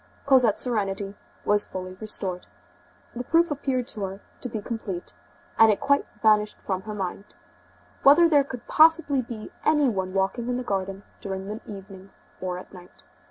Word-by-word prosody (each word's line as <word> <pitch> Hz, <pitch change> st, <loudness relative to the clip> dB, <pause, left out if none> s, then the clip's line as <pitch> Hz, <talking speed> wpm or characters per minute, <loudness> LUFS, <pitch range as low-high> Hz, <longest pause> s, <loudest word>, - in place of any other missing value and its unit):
Cosette's 255 Hz, -6 st, +4 dB
serenity 200 Hz, -4 st, -2 dB, 0.3 s
was 205 Hz, 0 st, +3 dB
fully 185 Hz, 0 st, -7 dB
restored. 190 Hz, -4 st, -3 dB, 0.7 s
The 245 Hz, -, -3 dB
proof 335 Hz, +4 st, +3 dB
appeared 265 Hz, -4 st, -1 dB
to 215 Hz, -, -5 dB
her 190 Hz, +1 st, -7 dB, 0.2 s
to 250 Hz, -, -5 dB
be 220 Hz, -, -3 dB
complete, 200 Hz, -, -5 dB, 0.5 s
and 225 Hz, -1 st, +8 dB
it 205 Hz, -, 0 dB
quite 280 Hz, 0 st, +2 dB, 0.2 s
vanished 210 Hz, -1 st, +3 dB
from 190 Hz, -1 st, -3 dB
her 215 Hz, +1 st, -6 dB
mind, 195 Hz, +1 st, -5 dB, 0.7 s
whether 305 Hz, +5 st, +7 dB
there 295 Hz, -4 st, +5 dB
could 250 Hz, -3 st, -8 dB
possibly 315 Hz, -4 st, +5 dB
be 230 Hz, -3 st, -8 dB
any 295 Hz, -2 st, +4 dB
one 190 Hz, -3 st, -3 dB
walking 195 Hz, +5 st, 0 dB
in 250 Hz, -, 0 dB
the 250 Hz, -, -3 dB
garden 195 Hz, -2 st, -3 dB, 0.2 s
during 190 Hz, -1 st, -5 dB
the 215 Hz, +2 st, -5 dB
evening 195 Hz, -1 st, -10 dB, 0.3 s
or 180 Hz, -1 st, -2 dB
at 180 Hz, -, -11 dB
night. 180 Hz, -1 st, -14 dB
215 Hz, 165 wpm, -25 LUFS, 195-255 Hz, 0.7 s, and